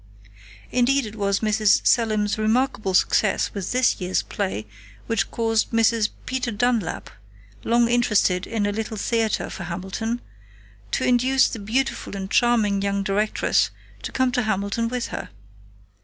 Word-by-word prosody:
"Indeed 255 +2 +2
it 215 0 -8
was 200 -2 0
Mrs. 215 -1 +3
Selim's 215 -3 +2
remarkable 215 -3 +1
success - - +2
with 200 -3 -4
this 250 -5 +2
year's 180 +1 0
play 190 - -3 0.4
which 230 -3 -1
caused 225 -1 0
Mrs. 230 -1 +2 0.2
Peter 255 -1 -2
Dunlap, 230 -2 -1 0.5
long 235 0 +3
interested 210 -6 +2
in 225 -3 -1
a 205 - 0
Little 220 +1 -4
Theater 225 0 0
for 175 - -6
Hamilton, 190 +7 -4 0.7
to - - -1
induce 255 +2 +3
the 225 - -6
beautiful 225 +1 -2
and 195 0 -6
charming 220 -5 +3
young 200 0 -1
directress 205 +2 +1 0.3
to - - -5
come 260 -1 +1
to 250 - +1
Hamilton 215 +1 -1
with 245 0 -3
her. - - -6
220 Hz, 140 wpm, -23 LUFS, 200-240 Hz, 0.7 s, Mrs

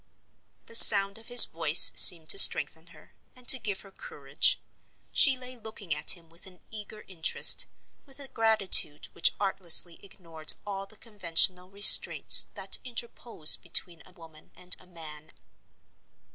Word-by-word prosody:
The - - -17
sound 200 -2 +4
of 225 - -20
his 245 -1 +7
voice 165 0 +3
seemed 165 -3 +7
to 395 - +1
strengthen - - +1
her, - - -25 0.2
and 250 -1 -21
to 260 - +4
give 205 -4 -9
her 195 - -21
courage. - - -7 0.5
She 275 -4 -2
lay 255 0 -14
looking 220 -7 -12
at 165 - -2
him 165 -1 -24
with 165 +3 -16
an 180 -2 -19
eager 215 0 -15
interest, 170 -4 -1 0.4
with 270 0 -16
a 280 - -9
gratitude 215 - -2
which - - -4
artlessly 180 -3 -4
ignored 165 -5 -10
all 195 -1 -12
the 215 - -21
conventional 185 -4 -5
restraints 200 +1 +3
that - - -4
interpose 235 -8 -4
between 170 -1 -7
a - - -20
woman 165 -3 -20
and 180 0 -6
a 185 - -21
man. 155 -3 -15
195 Hz, 150 wpm, -22 LUFS, 170-225 Hz, 0.5 s, his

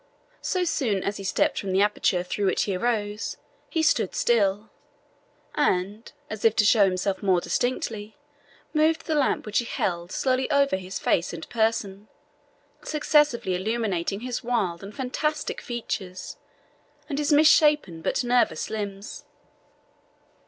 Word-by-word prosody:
So 370 -2 0
soon 235 - 0
as 200 - -2
he - - -7
had - - -3
stepped - - +1
from 195 -2 -3
the 195 +2 +4
aperture 200 -3 +1
through 200 +2 -2
which - - +1
he 195 - -2
arose, 210 0 -2 0.3
he 325 -2 0
stood 315 - +2
still, 210 -2 +1 0.8
and, 205 -5 0 0.2
as 215 -1 -7
if 225 -1 +4
to 210 - +3
show 210 -1 +6
himself 190 +1 -1
more 190 -3 +3
distinctly, 215 +2 -2 0.6
moved 320 +1 +2
the 315 - -1
lamp 290 -3 +1
which 210 -1 +1
he 240 - -2
held 175 -5 -2
slowly 260 0 0
over 280 -5 +3
his 190 0 -5
face 170 - 0
and 165 -1 -7
person, 220 -3 -1 0.7
successively 295 -9 +2
illuminating 200 -1 -1
his 250 -1 -4
wild 210 -9 -1
and 200 +2 -10
fantastic 295 +3 -2
features, 195 -6 -5 0.7
and 290 -2 -3
his 295 +1 0
misshapen 295 - +4
but 265 - 0
nervous 245 -3 +1
limbs. 205 -2 -6
215 Hz, 145 wpm, -25 LUFS, 195-255 Hz, 0.8 s, show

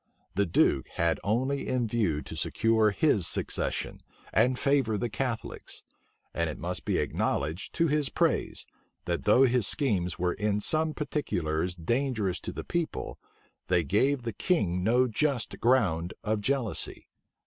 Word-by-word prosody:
The 100 +2 +1
duke 70 -5 +2
had 85 0 +1
only 130 +7 0
in 125 -2 0
view 100 -10 0
to - - -8
secure 110 -1 +2
his 100 - +2
succession, - - -1 0.3
and 125 +3 +3
favor 135 -7 +1
the 115 +2 -2
Catholics, 125 -2 -5 0.5
and 85 -1 -1
it 75 - -6
must - - -3
be - - +1
acknowledged 80 +7 -2
to 165 0 +2
his 150 -2 +1
praise, - - 0 0.4
that 85 -1 -2
though 115 +5 +6
his 125 -4 +3
schemes 100 - 0
were 90 0 0
in 105 0 0
some 155 +7 +1
particulars 90 - -2
dangerous 110 +1 -1
to - - -6
the - - -6
people, 170 -2 -3 0.5
they 90 -2 +2
gave 125 - +1
the 115 -2 -3
king 95 - 0
no 125 +5 +3
just 130 0 -1
ground 100 -9 +2
of 110 0 -1
jealousy. 125 -1 -1
110 Hz, 150 wpm, -28 LUFS, 90-135 Hz, 0.5 s, though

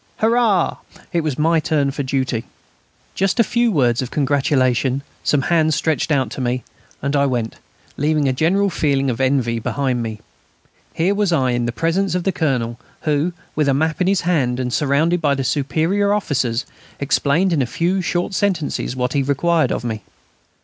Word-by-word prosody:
"Hurrah!" 220 -5 +2 0.4
It 170 - +2
was 155 -4 -2
my 165 +2 +3
turn 145 -3 0
for 145 - -4
duty.... 130 -4 -1 0.7
Just 195 +4 0
a - - +7
few 235 +2 +1
words 125 - +2
of 130 - -4
congratulation, 135 -2 +1 0.2
some 145 -2 +2
hands 160 0 +2
stretched 160 +1 0
out 130 -6 +1
to - - -5
me, 125 0 -1 0.4
and 140 +1 0
I 140 0 +3
went, 120 -4 -2 0.4
leaving 150 0 +1
a 130 - +2
general 190 +8 +2
feeling 140 -5 +1
of 115 - -3
envy 130 -3 +1
behind 130 +1 -1
me. 110 -2 -5 0.8
Here 175 +5 +2
was 205 -2 +1
I 130 -6 +2
in 120 -1 0
the - - -1
presence 175 +8 0
of 180 - -1
the 195 - +1
Colonel, 125 -9 -1 0.2
who, 155 +2 0 0.2
with 150 -2 +2
a 135 - +3
map 160 +4 0
in 180 - +2
his 195 -1 +2
hand 140 -8 0
and 125 -1 -2
surrounded 150 +7 +2
by 145 -3 +2
the 135 - -2
superior 160 - +1
officers, 130 - -1 0.3
explained 150 +6 +1
in 150 - +2
a 125 - 0
few 175 +9 0
short 175 +2 -1
sentences 180 - -1
what 125 0 -1
he 140 - +2
required 155 +4 +1
of - - -2
me. 110 -3 -3
145 Hz, 185 wpm, -20 LUFS, 130-170 Hz, 0.8 s, a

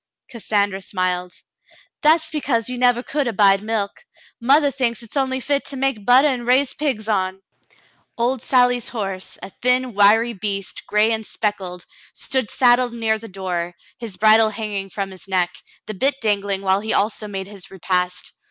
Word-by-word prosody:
Cassandra 205 -4 -1
smiled. 180 -1 -2 0.7
"That's 315 +1 +4
because 255 -7 0
you 250 -1 -5
never 245 -1 +3
could 285 -1 -1
abide 200 -3 +4
milk. 215 - -3 0.4
Mothah 280 +4 +4
thinks 245 -3 -1
it's 230 - -11
only 265 -1 0
fit 280 +2 0
to 275 - -3
make 260 -6 -1
buttah 255 +4 +6
and 240 -2 -6
raise 260 +2 +3
pigs 260 -8 -2
on." 190 -2 -1 0.7
Old 245 +1 0
Sally's 245 -2 +2
horse, 195 -5 -5
a - - -7
thin, 250 0 +2
wiry 215 +4 +4
beast, 195 -1 -4
gray 210 +2 +3
and 220 -1 -1
speckled, 190 -5 -4 0.3
stood 260 -2 -1
ready - - -12
saddled 245 -1 +3
near 220 -1 0
the 225 - -9
door, 180 -3 -4 0.2
his 225 -6 -7
bridle 220 +1 +5
hanging 210 -3 -4
from 195 +1 -4
his 190 0 -12
neck, 180 -2 0 0.3
the 215 - -5
bit 270 +8 +1
dangling 200 -3 0
while 190 0 +2
he 220 +2 -2
also 210 +1 0
made 195 -2 -5
his 195 -2 -10
repast. 180 -1 -2
220 Hz, 170 wpm, -21 LUFS, 195-250 Hz, 0.7 s, buttah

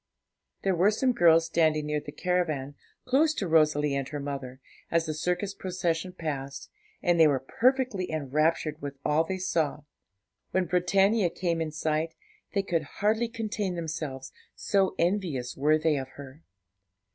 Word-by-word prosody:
There 195 - +2
were 180 +4 +4
some 250 +4 +2
girls 165 -7 +5
standing 155 -2 +2
near 150 0 -1
the 145 - -7
caravan, 155 -5 -1 0.3
close 300 +5 +3
to 195 - -2
Rosalie 150 -3 +3
and 135 -1 -1
her 150 - -5
mother, 135 -2 -5 0.3
as 165 -1 +2
the 155 - -2
circus 180 +5 -1
procession 180 -2 -2
passed, 140 -5 -5 0.3
and 175 -1 +3
they 160 - +8
were 140 -3 +2
perfectly 250 -6 +1
enraptured 155 +1 0
with 140 -1 -5
all 150 +2 +3
they 190 +3 -3
saw. 160 -5 -1 0.7
When 185 0 +1
Britannia 190 +3 +3
came 170 -1 -1
in 160 -1 -2
sight, 155 +1 -1 0.4
they 200 - +2
could 170 -4 0
hardly 215 +9 0
contain 215 -5 -3
themselves, 155 -5 -5 0.2
so 195 -2 +1
envious 170 -9 -1
were 150 +3 +3
they 155 -1 +1
of 135 -1 -4
her. 140 +2 -11
165 Hz, 155 wpm, -28 LUFS, 150-185 Hz, 0.7 s, they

